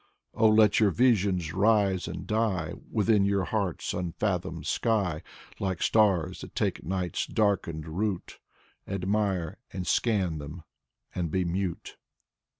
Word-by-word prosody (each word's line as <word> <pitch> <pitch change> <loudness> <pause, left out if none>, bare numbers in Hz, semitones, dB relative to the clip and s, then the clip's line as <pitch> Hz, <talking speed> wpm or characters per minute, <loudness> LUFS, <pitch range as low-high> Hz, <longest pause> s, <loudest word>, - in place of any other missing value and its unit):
Oh, 110 - +4
let 110 -1 +5
your 105 -2 +5
visions 95 -7 +2
rise 100 -1 +2
and 90 - -6
die 105 -7 0 0.2
Within 105 -1 +3
your 100 -1 +1
heart's 100 -3 -2
unfathomed 90 -2 -2
sky. 100 -9 0 0.4
Like 95 -3 -2
stars 100 -7 +2
that - - -10
take - - -1
night's 90 -1 -2
darkened 90 -7 0
route. 95 +3 -3 0.5
Admire 95 -3 -1
and 95 -1 -4
scan 95 -10 +1
them 75 +3 -8 0.5
and 85 -2 -2
be 90 +3 0
mute. 90 0 -3
95 Hz, 125 wpm, -28 LUFS, 85-105 Hz, 0.5 s, let